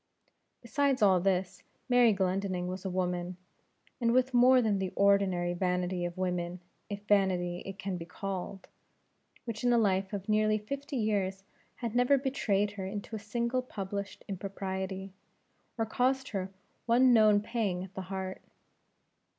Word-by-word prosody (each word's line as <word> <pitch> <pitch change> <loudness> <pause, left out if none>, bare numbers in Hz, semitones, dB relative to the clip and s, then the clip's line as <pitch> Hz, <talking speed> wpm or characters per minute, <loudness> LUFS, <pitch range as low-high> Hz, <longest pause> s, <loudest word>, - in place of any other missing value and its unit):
Besides 270 0 +1
all 190 -3 +6
this, 185 0 0 0.3
Mary 245 -2 +5
Glendinning 190 -2 -1
was 185 +1 -5
a 190 - -2
woman, 180 -1 -2 0.6
and 235 -1 +2
with 255 +1 +2
more 250 +1 +6
than 215 -5 +1
the 190 -1 -1
ordinary 195 -3 +3
vanity 180 0 -1
of 175 +1 -5
women 180 -1 -2 0.3
if 205 0 -5
vanity 185 -4 +2
it 195 0 -6
can 195 -2 -3
be 165 - -7
called 190 +1 -5 0.8
which 230 -2 -5
in 245 - +3
a 240 - +5
life 195 -3 +2
of 200 -1 -5
nearly 215 0 +3
fifty 280 +7 -5
years 195 -4 0 0.3
had 235 -3 -4
never 250 +3 +4
betrayed 210 -7 0
her 195 -2 -6
into 205 +3 -5
a - - -4
single 235 +4 -1
published 200 -4 -6
impropriety, 190 0 -4 0.6
or 225 - +1
caused 260 +4 0
her 195 -3 -3 0.4
one 245 +2 +5
known 215 -2 +6
pang 210 -5 -2
at 190 0 -10
the 190 - -5
heart. 190 -1 -4
200 Hz, 150 wpm, -30 LUFS, 185-230 Hz, 0.8 s, all